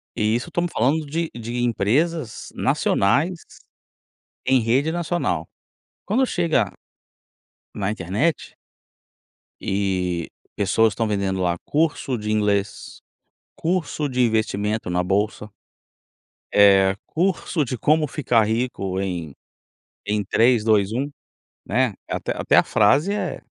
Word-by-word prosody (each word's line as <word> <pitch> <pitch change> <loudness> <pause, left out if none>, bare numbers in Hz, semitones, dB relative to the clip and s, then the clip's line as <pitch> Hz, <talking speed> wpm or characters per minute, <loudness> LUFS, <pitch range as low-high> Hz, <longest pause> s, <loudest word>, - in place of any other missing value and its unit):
E 105 +1 +1
isso 120 - -3
estamos 175 -1 -1
falando 145 +7 +1
de 165 +3 -2
de 120 +1 -5
empresas 120 +5 0
nacionais 150 - +1 1.1
em 130 -2 +4
rede 130 +8 +1
nacional. 170 - -1 0.6
Quando 240 +7 +2
chega 155 - +1 1.0
na 100 0 -1
internet 110 - -1 1.1
e 95 -3 -1 0.3
pessoas 110 +3 +2
estão 115 -2 -1
vendendo 100 -2 -1
lá 85 -1 0
curso 145 -4 0
de 105 0 -3
inglês, 105 -1 -1 0.5
curso 160 -3 -1
de 125 0 0
investimento 110 -3 0
na 90 0 0
bolsa. 105 +3 -1 1.1
Eh 95 -1 +6
curso 170 -3 0
de 125 - -3
como 155 +3 +3
ficar 125 -6 +2
rico 105 -4 -2
em 85 -7 -4 0.7
em 105 0 +1
3, 115 +2 +3
2, 105 -2 +2
1, 135 +5 -2 0.6
né, 120 -1 +1
até - - -2
até - - +2
a - - +7
frase 140 - +3
é 210 - -3
110 Hz, 115 wpm, -22 LUFS, 100-145 Hz, 1.1 s, a